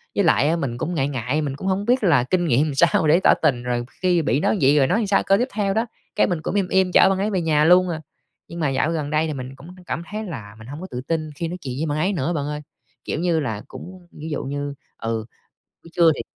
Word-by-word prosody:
Với 200 - +2
lại 155 -3 +3
á 165 - +2
mình 130 -7 -3
cũng 175 +7 -3
ngại 135 -2 +1
ngại, 130 +3 -1
mình 140 -3 -3
cũng 190 - -6
hông 195 +2 0
biết 245 -1 +2
là 145 -10 +4
kinh 175 +5 0
nghiệm 145 +2 +3
làm 145 - -4
sao 160 +1 +3
để 165 +4 +5
tỏ - - +7
tình 120 -3 +2
rồi 120 -1 -2 0.2
khi 180 -2 +3
bị 135 -1 +1
đối 210 - +1
vậy 140 +3 +5
rồi 135 -2 +4
nói 180 - +2
làm 210 - -1
sao 195 - +2
câu 195 +1 +3
tiếp 245 - 0
theo 200 -2 0
đó. 225 +2 +1 0.3
Cái, - - +3
mình 175 -3 -2
cũng 165 - -3
im 195 -3 +1
im 190 -1 +2
chở 190 - +6
bạn 190 - +1
ấy 205 +2 0
về 185 - 0
nhà 155 -2 +2
luôn 180 +1 +5
à. 160 -2 -3 0.5
Nhưng 170 - -8
mà 150 - +1
dạo 135 +4 0
gần 150 -3 -2
đây 155 +1 +1
thì 155 - -3
mình 130 0 -7
cũng 145 +5 -14 0.2
cảm 170 - -3
thấy 215 +1 -3
là 110 - -8
mình 110 - -12
hông 145 +5 -8
có 185 - -6
tự 125 - -4
tin 155 +2 -2
khi 170 - -3
nói 180 +2 -5
chuyện 130 -2 -5
với 160 - 0
bạn 145 - -1
ấy 185 +6 +1
nữa 170 0 -1
bạn 145 -3 -2
ơi, 150 0 -4 0.4
kiểu - - -3
như 170 -2 +1
là, 110 -7 -3
cũng 180 -1 -11
ví 155 +2 -8
dụ - - -2
như, 145 +1 -4 0.2
ừ, 115 -1 -3 0.6
buổi 165 - -15
trưa 170 -2 +5
thì - - -4
160 Hz, 295 wpm, -22 LUFS, 140-180 Hz, 0.6 s, tỏ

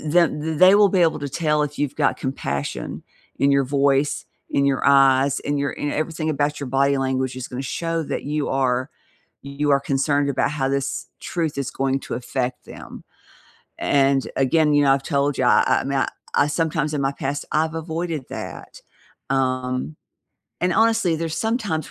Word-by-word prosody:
eh, 155 - -6
them 170 -4 +3
th 160 -1 -3
they 185 +2 +7
will 205 -1 +6
be 185 -2 +2
able 160 -2 +2
to 145 - -3
tell 150 +1 0
if 150 0 -4
you've 145 -1 -1
got - - +1
compassion 70 - -4 0.4
in 140 0 +3
your 140 -1 +3
voice, 140 +1 +1 0.3
in 140 - +1
your 135 -2 +1
eyes, 135 -1 +4
in 145 0 -2
your 140 0 -1
in 145 - -4
e - - -2
everything 155 0 -2
about 145 0 -1
your 140 -3 -5
body 140 0 +3
language 130 -1 -1
is 130 - -6
gonna 125 +1 -5
show 165 +4 -2
that - - -4
you 150 0 -2
are 130 0 0 0.5
you 140 +1 -2
are 140 -1 +4
concerned 140 +1 0
about 140 - 0
how 135 -3 -1
this 140 0 -2
truth 160 -5 -3
is 135 -1 -2
going 135 0 -1
to - - -6
affect 125 +1 -3
them. - - -11 0.7
And, 135 -1 +2
again, 150 +3 +3
you 145 0 +4
know, 135 - +4
I've 135 0 -1
told 140 0 +1
you, 125 - +1
I - - +5 0.2
I - - -6
mean, 140 -1 +1 0.3
I 145 - +4
sometimes 155 -1 -1
in - - -1
my 135 +1 0
past, 140 0 -4
I've 160 +1 0
avoided 160 -2 -4
that. - - -8 0.5
Um, 130 +1 -1 0.7
and 180 0 +1
honestly 225 -4 +3
there's 165 0 -3
some 225 +2 0
times 160 - -3
140 Hz, 190 wpm, -22 LUFS, 135-155 Hz, 0.7 s, they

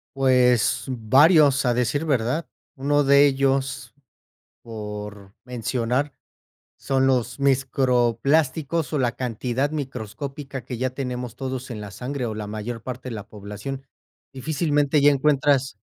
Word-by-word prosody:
Pues, 125 -4 +3
varios 135 - +4
a 120 - +3
decir 125 +6 0
verdad. 135 +3 0 0.3
Uno 145 +2 +2
de 140 +1 +6
ellos 135 -1 0 0.7
por 105 -3 -8
mencionar 125 +3 -1 0.7
son 135 -1 +1
los 125 0 0
microplásticos 135 +4 +1
o 150 - +1
la 125 - +2
cantidad 125 +3 -2
microscópica 135 0 -6
que 125 - -6
ya 130 +1 0
tenemos 125 -2 -5
todos 130 -1 -5
en 110 - -6
la 105 -1 -7
sangre 125 +4 -4
o 110 -2 -4
la 105 - -5
mayor 110 +3 -5
parte 130 +2 -7
de 115 - -5
la 105 - -8
población. 105 +6 -7 0.5
Difícilmente 145 +1 +1
ya 145 - +6
encuentras 140 -3 +2
130 Hz, 130 wpm, -23 LUFS, 120-140 Hz, 0.7 s, de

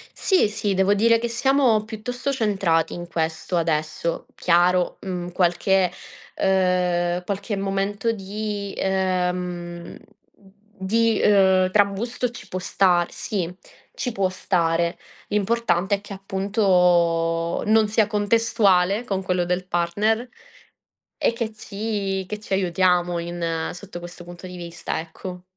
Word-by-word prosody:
Sì, 375 - +3
sì, 205 -1 -2
devo 190 +2 +3
dire 230 +3 +4
che 235 - -2
siamo 240 -2 +2
piuttosto 245 +5 -4
centrati 195 - +1
in 175 0 -6
questo 165 +1 -2
adesso. 160 0 -1
Chiaro, 180 +1 +2
mhmm, 180 -2 -4
qualche, 180 +1 +2 0.4
ehm 180 -2 +1
qualche 200 +2 -3
momento 195 +3 -1
di 205 0 -4
,ehm 180 -2 -2 0.8
di, 225 +3 +1
ehm, 190 -2 +4
trambusto 210 +5 +1
ci 240 - -11
può 185 - -4
star 180 -2 +2
sì, 185 -6 -3 0.4
ci 250 - -2
può 195 -3 0
stare. 170 -2 0 0.3
L'importante 205 -2 +1
è 200 - -9
che 205 - -9
appunto 180 -4 +1
non 220 0 +4
sia 215 0 +3
contestuale 210 -1 +2
con 195 -4 -2
quello 180 -2 0
del 180 +1 -1
partner 205 +7 0 0.9
e - - +1
che 230 -1 -3
ci 200 -3 -3
che 210 - -4
ci 210 -1 -9
aiutiamo 180 -2 +2
in 170 -1 -3
sotto 180 -1 -9
questo 175 0 -10
punto 175 +1 -10
di 180 0 -8
vista, 170 -2 -4
ecco. 180 +2 -9
190 Hz, 125 wpm, -23 LUFS, 175-210 Hz, 0.9 s, dire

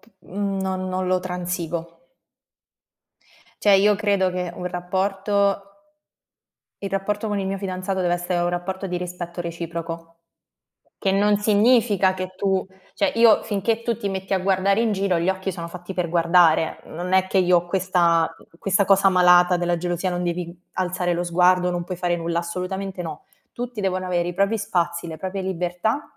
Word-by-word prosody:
p - - -25
mhmm, 195 +1 -3
non 185 -1 -2
non 185 0 -2
lo 185 0 +2
transigo. 175 -2 -5 1.5
Cioè 205 -2 +5
io 205 +2 +4
credo 200 -3 +1
che 180 -1 -3
un 180 - -5
rapporto 195 +3 0 1.2
il 195 - -3
rapporto 205 +3 -2
con 205 -1 -1
il 195 - -2
mio 195 0 -2
fidanzato 190 0 -3
deve 175 -1 +2
essere 175 0 -2
un 175 - +1
rapporto 190 +2 -3
di 180 -1 -3
rispetto 175 -1 -5
reciproco, 165 0 -6 0.8
che 195 - 0
non 205 +1 +3
significa 210 -2 +3
che 185 0 -5
tu 190 -1 0 0.3
cioè 200 - +1
io 230 -2 +6
finché 220 +2 -1
tu 230 -2 -1
ti 200 - -3
metti 190 0 -2
a - - +2
guardare 195 +2 +2
in 225 -2 +1
giro, 195 -3 +1
gli 170 - -1
occhi 190 0 -3
sono 170 -2 -6
fatti 180 +2 -8
per 175 -2 -1
guardare, 170 -2 +3
non 180 +3 -5
è 190 0 +4
che 190 - +1
io 180 -1 +5
ho 175 - -6
questa 175 -3 +2 0.3
questa 195 +1 +2
cosa 195 0 +5
malata 180 -1 +5
della 175 0 0
gelosia, 175 +1 -2
non 175 0 -2
devi 175 0 -3 0.2
alzare 180 -1 -1
lo 175 +1 -1
sguardo, 180 +1 +3
non 175 -1 -2
puoi 185 0 -5
fare 175 -1 0
nulla, 170 0 -1
assolutamente 185 +2 -4
no. 155 -3 -7 0.3
Tutti 245 -2 -5
devono 185 -1 -1
avere 175 -1 0
i 175 - -5
propri 200 +3 +1
spazi, 175 -4 -1
le 160 - -6
proprie 190 +4 -4
libertà, 185 - -1
185 Hz, 175 wpm, -23 LUFS, 175-195 Hz, 1.5 s, io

